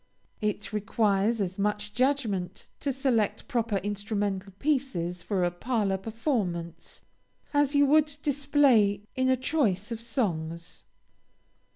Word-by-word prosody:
It 210 Hz, 0 st, -2 dB
requires 210 Hz, +1 st, +1 dB
as 190 Hz, 0 st, -2 dB
much 210 Hz, 0 st, -1 dB
judgment 220 Hz, -8 st, 0 dB
to 280 Hz, -, -1 dB
select 250 Hz, -6 st, 0 dB
proper 230 Hz, -6 st, 0 dB
instrumental 200 Hz, 0 st, -2 dB
pieces 225 Hz, -, -1 dB
for 190 Hz, -1 st, -1 dB
a 175 Hz, -, +2 dB
parlor 205 Hz, 0 st, 0 dB
performance, 200 Hz, -, -3 dB, 0.5 s
as 290 Hz, 0 st, +2 dB
you 285 Hz, 0 st, +6 dB
would 300 Hz, +1 st, +3 dB
display 275 Hz, -8 st, +3 dB
in 260 Hz, 0 st, +2 dB
a 260 Hz, -, +4 dB
choice 240 Hz, -, 0 dB
of 230 Hz, -1 st, -4 dB
songs. 170 Hz, -, -3 dB
215 Hz, 115 wpm, -28 LUFS, 195-260 Hz, 0.5 s, you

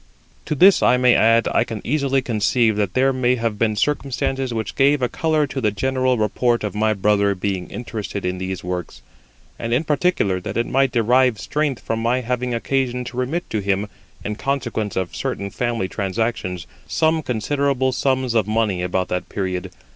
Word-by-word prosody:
To 150 Hz, -, -2 dB
this 190 Hz, +7 st, +6 dB
I 125 Hz, -, +4 dB
may 125 Hz, -1 st, +5 dB
add, 115 Hz, 0 st, +4 dB
I -, -, +4 dB
can 110 Hz, -2 st, -6 dB
easily 135 Hz, -1 st, +1 dB
conceive 115 Hz, -1 st, +2 dB
that 100 Hz, -3 st, -1 dB
there 135 Hz, +1 st, +3 dB
may 125 Hz, -1 st, +2 dB
have 115 Hz, -3 st, -2 dB
been 110 Hz, -2 st, +1 dB
circumstances 135 Hz, +1 st, -1 dB
which 110 Hz, -2 st, -3 dB
gave 140 Hz, +2 st, +3 dB
a 125 Hz, -, +1 dB
colour 155 Hz, +4 st, +1 dB
to 135 Hz, -1 st, -5 dB
the 110 Hz, -, +2 dB
general 130 Hz, +4 st, 0 dB
report 120 Hz, +3 st, +1 dB
of 105 Hz, -, -3 dB
my 110 Hz, +1 st, +1 dB
brother 100 Hz, 0 st, +2 dB
being 95 Hz, -1 st, -3 dB
interested 110 Hz, -5 st, -5 dB
in 90 Hz, 0 st, -2 dB
these 95 Hz, 0 st, -4 dB
works; 90 Hz, -1 st, -5 dB, 0.6 s
and 115 Hz, -, -3 dB
in 140 Hz, -, +1 dB
particular 150 Hz, -, +1 dB
that 90 Hz, -, -5 dB
it 115 Hz, -, +1 dB
might 135 Hz, 0 st, +2 dB
derive 120 Hz, 0 st, +3 dB
strength 145 Hz, -4 st, -2 dB
from 115 Hz, -, -2 dB
my 120 Hz, +3 st, +1 dB
having 125 Hz, +1 st, -2 dB
occasion 125 Hz, +1 st, -1 dB
to 125 Hz, 0 st, -8 dB
remit 140 Hz, +8 st, -2 dB
to 110 Hz, -, 0 dB
him, 100 Hz, +1 st, 0 dB, 0.4 s
in 105 Hz, 0 st, -3 dB
consequence 120 Hz, -7 st, -2 dB
of 95 Hz, -2 st, -2 dB
certain 100 Hz, 0 st, -3 dB
family 120 Hz, -4 st, -1 dB
transactions, 95 Hz, -3 st, -2 dB, 0.2 s
some 160 Hz, 0 st, +1 dB
considerable 130 Hz, +1 st, 0 dB
sums 130 Hz, -1 st, 0 dB
of 110 Hz, -3 st, +2 dB
money 110 Hz, -4 st, 0 dB
about 90 Hz, +1 st, -1 dB
that 90 Hz, -, -3 dB
period. 95 Hz, -1 st, -3 dB
115 Hz, 185 wpm, -21 LUFS, 105-130 Hz, 0.6 s, this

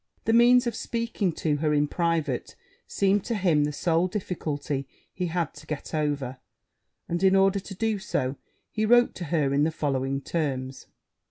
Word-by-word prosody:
The 225 Hz, -, +2 dB
means 245 Hz, +2 st, +6 dB
of 235 Hz, -, -1 dB
speaking 230 Hz, -6 st, -2 dB
to 155 Hz, -1 st, 0 dB
her 150 Hz, 0 st, +1 dB
in 145 Hz, 0 st, +2 dB
private 165 Hz, -5 st, -1 dB, 0.3 s
seemed 195 Hz, 0 st, +1 dB
to 235 Hz, -, -1 dB
him 170 Hz, -7 st, +2 dB
the 150 Hz, -, -2 dB
sole 165 Hz, +3 st, +1 dB
difficulty 150 Hz, -8 st, -3 dB, 0.3 s
he 180 Hz, -1 st, -2 dB
had 170 Hz, -2 st, -2 dB
to 150 Hz, +1 st, -14 dB
get 150 Hz, +1 st, -5 dB
over: 145 Hz, -4 st, -1 dB, 0.7 s
and, 170 Hz, +1 st, -2 dB
in 190 Hz, 0 st, +5 dB
order 195 Hz, +1 st, +4 dB
to 195 Hz, 0 st, -9 dB
do 220 Hz, +1 st, 0 dB
so, 130 Hz, -7 st, -2 dB, 0.4 s
he 215 Hz, -, -1 dB
wrote 240 Hz, +2 st, +5 dB
to 175 Hz, -, -6 dB
her 150 Hz, -3 st, +1 dB
in 145 Hz, +1 st, +3 dB
the 155 Hz, -, +3 dB
following 135 Hz, -3 st, -1 dB
terms. 135 Hz, -4 st, -3 dB
165 Hz, 175 wpm, -26 LUFS, 145-195 Hz, 0.7 s, means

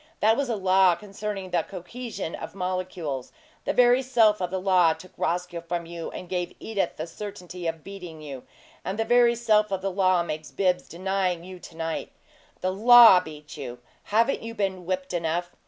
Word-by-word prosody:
That 220 Hz, +1 st, +4 dB
was 275 Hz, 0 st, -1 dB
a 230 Hz, -, 0 dB
law 190 Hz, -2 st, +4 dB
concerning 200 Hz, -1 st, -6 dB
the 175 Hz, -, +2 dB
cohesion 200 Hz, +1 st, -7 dB
of -, -, -7 dB
molecules. 180 Hz, -7 st, -3 dB, 0.3 s
The -, -, 0 dB
very 245 Hz, +1 st, +5 dB
self 225 Hz, -6 st, +3 dB
of 180 Hz, -, -1 dB
the 190 Hz, +1 st, -2 dB
law 185 Hz, -3 st, +4 dB
took 185 Hz, -, -14 dB
Roscoe 175 Hz, 0 st, -2 dB
from 170 Hz, 0 st, -4 dB
you 170 Hz, 0 st, -6 dB
and 180 Hz, -, -8 dB
gave 180 Hz, -1 st, -3 dB
Edith 200 Hz, -5 st, -2 dB
the 155 Hz, -, -3 dB
certainty 180 Hz, -1 st, -7 dB
of 165 Hz, -1 st, -4 dB
beating 180 Hz, -5 st, -9 dB
you; 140 Hz, -4 st, -8 dB, 0.4 s
and 190 Hz, +3 st, -3 dB
the 225 Hz, -, 0 dB
very 240 Hz, 0 st, +4 dB
self 215 Hz, -3 st, +2 dB
of 190 Hz, -1 st, -2 dB
the 195 Hz, -, -1 dB
law 185 Hz, -2 st, +3 dB
makes 155 Hz, -2 st, -5 dB
Bibbs 180 Hz, -2 st, 0 dB
deny 190 Hz, +1 st, 0 dB
you 180 Hz, +2 st, -10 dB
to 165 Hz, -, -13 dB
night. 165 Hz, -1 st, -3 dB, 0.5 s
The 185 Hz, -, 0 dB
LAW 230 Hz, -1 st, +9 dB
beats 150 Hz, -3 st, -10 dB
you. 125 Hz, -4 st, -6 dB, 0.3 s
Haven't 230 Hz, +6 st, +2 dB
you 230 Hz, 0 st, -7 dB
been 190 Hz, -4 st, -2 dB
whipped 185 Hz, 0 st, -2 dB
enough? 170 Hz, +1 st, -1 dB
185 Hz, 190 wpm, -26 LUFS, 170-210 Hz, 0.5 s, LAW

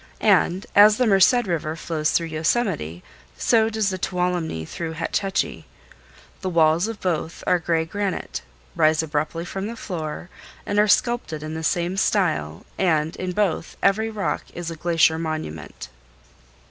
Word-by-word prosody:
And 185 Hz, +3 st, +1 dB
as 210 Hz, +1 st, +8 dB
the 255 Hz, -, +2 dB
Merced 215 Hz, +4 st, +5 dB
River 160 Hz, -4 st, -2 dB
flows 160 Hz, -2 st, -2 dB
through 170 Hz, -, +1 dB
Yosemite, 155 Hz, -, -1 dB, 0.3 s
so 225 Hz, -1 st, +3 dB
does 220 Hz, -3 st, 0 dB
the 185 Hz, -, -4 dB
Tuolumne 180 Hz, -, -1 dB
through 165 Hz, -, -5 dB
Hetch 160 Hz, -, -1 dB
Hetchy. 195 Hz, -1 st, -2 dB, 0.7 s
The 190 Hz, -, -2 dB
walls 165 Hz, +2 st, +3 dB
of 225 Hz, -2 st, -6 dB
both 165 Hz, -3 st, -2 dB
are 180 Hz, -, +3 dB
of 170 Hz, -, -13 dB
gray 165 Hz, -1 st, +1 dB
granite, 200 Hz, +3 st, -3 dB, 0.3 s
rise 155 Hz, +1 st, +3 dB
abruptly 155 Hz, +2 st, -2 dB
from 195 Hz, +3 st, -4 dB
the 230 Hz, -, -6 dB
floor, 175 Hz, -4 st, -6 dB, 0.3 s
are 205 Hz, +1 st, +2 dB
sculptured 205 Hz, -8 st, +1 dB
in 155 Hz, 0 st, -5 dB
the 160 Hz, -, -4 dB
same 175 Hz, +3 st, 0 dB
style 160 Hz, -, 0 dB
and 160 Hz, -4 st, +1 dB
in 185 Hz, -1 st, -3 dB
both 180 Hz, -4 st, -1 dB
every 220 Hz, +3 st, +3 dB
rock 215 Hz, -3 st, -2 dB
is 170 Hz, -1 st, -4 dB
a -, -, -6 dB
glacier 160 Hz, -1 st, +2 dB
monument. 80 Hz, -, -5 dB
170 Hz, 155 wpm, -23 LUFS, 160-195 Hz, 0.7 s, as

